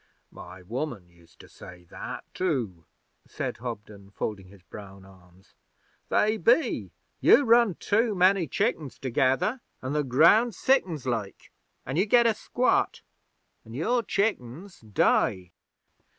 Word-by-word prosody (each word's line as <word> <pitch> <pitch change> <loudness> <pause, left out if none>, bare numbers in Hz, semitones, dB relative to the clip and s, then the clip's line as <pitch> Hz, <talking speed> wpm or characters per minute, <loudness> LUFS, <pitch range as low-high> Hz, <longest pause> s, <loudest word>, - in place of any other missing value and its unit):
'My 90 +1 -12
woman 115 - -5
used 85 -1 -24
to - - -16
say 90 0 -13
that - - -7
too,' 120 - -2 0.4
said - - -5
Hobden, 105 -4 -8
folding 100 -1 -5
his 95 -1 -18
brown 100 -1 -12
arms. 95 -1 -21 0.6
'They 215 +1 +2
be. 240 - +1 0.3
You 285 - +6
run 230 -5 +4
too 220 +1 0
many 185 -1 +3
chickens 165 - -2
together, 135 - 0 0.2
an' 130 +2 -5
the 150 0 0
ground 170 - +4
sickens, 180 - 0
like, 110 -6 -4 0.3
an' 135 +4 -4
you 190 +4 +2
get 235 +3 +4
a 230 - +4
squat, 245 +4 0 0.6
an' 115 - -12
your 235 - 0
chickens 195 - -3
die. 95 -3 0
130 Hz, 130 wpm, -26 LUFS, -, 0.6 s, You